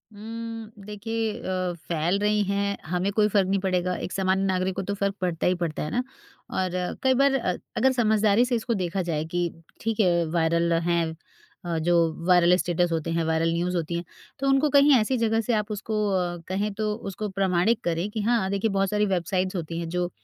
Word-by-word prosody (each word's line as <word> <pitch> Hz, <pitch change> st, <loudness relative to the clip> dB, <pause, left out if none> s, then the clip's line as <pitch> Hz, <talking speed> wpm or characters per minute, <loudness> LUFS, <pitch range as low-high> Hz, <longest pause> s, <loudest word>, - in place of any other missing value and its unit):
उम, 225 Hz, +1 st, -7 dB
देखिए 220 Hz, +1 st, -3 dB
अ, 185 Hz, -1 st, -2 dB, 0.2 s
फैल 170 Hz, +4 st, +1 dB
रही 210 Hz, 0 st, +2 dB
हैं, 200 Hz, +1 st, -1 dB
हमें 180 Hz, +4 st, -1 dB
कोई 210 Hz, -1 st, +3 dB
फ़र्क 195 Hz, -2 st, +2 dB
नहीं 195 Hz, 0 st, +1 dB
पड़ेगा, 180 Hz, -1 st, 0 dB
एक -, -, -5 dB
सामान्य 190 Hz, 0 st, +1 dB
नागरिक 185 Hz, 0 st, 0 dB
को -, -, -2 dB
तो 200 Hz, -, -3 dB
फ़र्क 200 Hz, 0 st, -1 dB
पड़ता 175 Hz, -2 st, 0 dB
ही 180 Hz, -, +3 dB
पड़ता 170 Hz, -4 st, -3 dB
है 150 Hz, -, -3 dB
ना? 245 Hz, -, 0 dB, 0.5 s
और 185 Hz, -1 st, -1 dB, 0.3 s
कई 260 Hz, 0 st, +4 dB
बार 275 Hz, +1 st, +3 dB
अ, 185 Hz, -8 st, 0 dB, 0.2 s
अगर 265 Hz, 0 st, +4 dB
समझदारी 220 Hz, -1 st, +3 dB
से 245 Hz, -1 st, 0 dB
इसको 230 Hz, +1 st, -1 dB
देखा 185 Hz, -1 st, -1 dB
जाए 155 Hz, -1 st, -1 dB
कि 175 Hz, -1 st, +1 dB, 0.3 s
ठीक 225 Hz, 0 st, -2 dB
है 170 Hz, -4 st, +3 dB
वायरल 170 Hz, +1 st, +2 dB
हैं 170 Hz, 0 st, +1 dB, 0.6 s
अ, 170 Hz, -1 st, -1 dB
जो 170 Hz, +2 st, +2 dB, 0.3 s
वायरल 180 Hz, 0 st, +6 dB
स्टेटस 175 Hz, -1 st, 0 dB
होते 165 Hz, 0 st, -1 dB
हैं, 165 Hz, 0 st, 0 dB
वायरल 160 Hz, +1 st, +1 dB
न्यूज़ 175 Hz, +2 st, -1 dB
होती 170 Hz, +1 st, -2 dB
हैं, 170 Hz, -, -2 dB, 0.4 s
तो 275 Hz, -, -1 dB
उनको 270 Hz, +2 st, +3 dB
कहीं 280 Hz, +1 st, +6 dB
ऐसी 250 Hz, +4 st, 0 dB
जगह 225 Hz, 0 st, +1 dB
से 235 Hz, -, -1 dB
आप 215 Hz, 0 st, -1 dB
उसको 210 Hz, 0 st, -1 dB
अ, 175 Hz, -2 st, 0 dB
कहें 200 Hz, +3 st, -1 dB
तो 210 Hz, 0 st, -1 dB, 0.2 s
उसको 210 Hz, +2 st, -4 dB
प्रमाणित 190 Hz, +3 st, +1 dB
करें 170 Hz, +4 st, -1 dB
कि 215 Hz, -, -3 dB
हाँ, 220 Hz, -3 st, +1 dB
देखिए 200 Hz, +3 st, 0 dB
बहुत 195 Hz, -1 st, +1 dB
सारी 210 Hz, 0 st, +1 dB
वेबसाइट्स 185 Hz, 0 st, -1 dB
होती 165 Hz, -1 st, -4 dB
हैं 165 Hz, -1 st, -4 dB
जो 180 Hz, 0 st, -1 dB
190 Hz, 210 wpm, -25 LUFS, 175-215 Hz, 0.6 s, वायरल